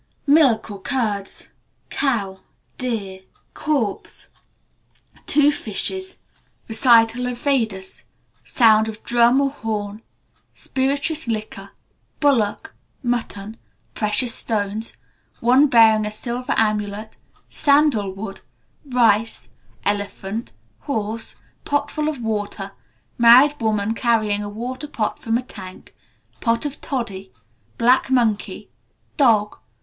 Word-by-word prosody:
Milk 280 -8 +4
or 200 -1 -9
curds. 210 -6 -2 0.4
Cow. 205 -9 -1 0.4
Deer. 205 -7 -4 0.3
Corpse. 275 -10 -3 1.0
Two 295 0 +4
fishes. 375 - -2 0.5
Recital 230 +1 +4
of 250 -1 -4
Vedas. 225 -8 -2 0.4
Sound 220 -3 +4
of 220 0 -8
drum 240 +2 +4
or 275 -1 +1
horn. 215 -4 -4 0.5
Spirituous 280 +3 -1
liquor. 215 -3 -4 0.5
Bullock. 250 -8 +1 0.3
Mutton. 225 -3 -3 0.4
Precious 220 +3 +1
stones. 215 0 -2 0.4
One 255 +5 +5
bearing 220 -4 +5
a - - -4
silver 240 +3 -3
armlet. 210 0 -1 0.3
Sandalwood. 220 -9 +1 0.4
Rice. 230 -5 +1 0.4
Elephant. 205 +2 -3 0.3
Horse. 225 -4 -4 0.3
Pot 290 0 -1
full 305 0 -1
of 300 -4 -5
water. 205 -2 -3 0.5
Married 255 +5 +6
woman 215 -1 0
carrying 220 -3 +1
a 205 - -5
water 250 +7 -6
pot 225 -7 -3
from 225 0 0
a 250 - -4
tank. 190 -6 -11 0.5
Pot 230 +2 0
of 290 0 -5
toddy. 215 - -4 0.5
Black 255 +3 +3
monkey. 235 -5 0 0.5
Dog. 220 -7 +3
225 Hz, 100 wpm, -21 LUFS, 210-260 Hz, 1.0 s, Married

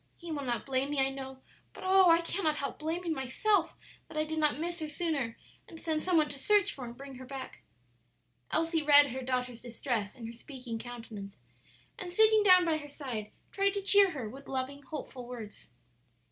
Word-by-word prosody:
He 340 -1 -8
will 295 -2 -2
not 245 -3 -2
blame 270 0 0
me, 290 -1 -1
I 270 0 +3
know, 265 -1 -8 0.3
but - - -10
oh, 375 -1 +6
I 335 0 +6
cannot 335 -2 0
help 280 -2 -4
blaming 330 +2 -2
myself 325 - 0 0.3
that - - -9
I 310 - +2
did 315 0 -3
not 300 -2 +2
miss 345 +2 -3
her 310 -1 -4
sooner 295 -7 -2 0.3
and 325 - -11
send 315 -2 -1
some 365 0 +2
one 305 -1 +4
to 280 - -6
search 405 +4 +3
for 260 - -7
and 235 0 -9
bring 275 -1 -9
her 260 - -9
back." 270 0 -8 0.9
Elsie 330 0 +1
read 290 -2 +7
her 260 +2 -4
daughter's 250 -2 -2
distress 235 -3 -3
in 235 - -9
her 230 - -6
speaking 245 -2 -7
countenance, 225 -5 -8 0.6
and 360 -2 -5
sitting 435 +3 +5
down 365 -3 +7
by 320 -2 +2
her 295 -1 -9
side 245 -8 -6 0.2
tried 395 0 +1
to 400 - -2
cheer 400 0 +7
her 270 -10 -5
with 270 +6 -11
loving, 270 +2 -3
hopeful 265 -3 -7
words. 230 -4 -9
285 Hz, 200 wpm, -31 LUFS, 255-335 Hz, 0.9 s, read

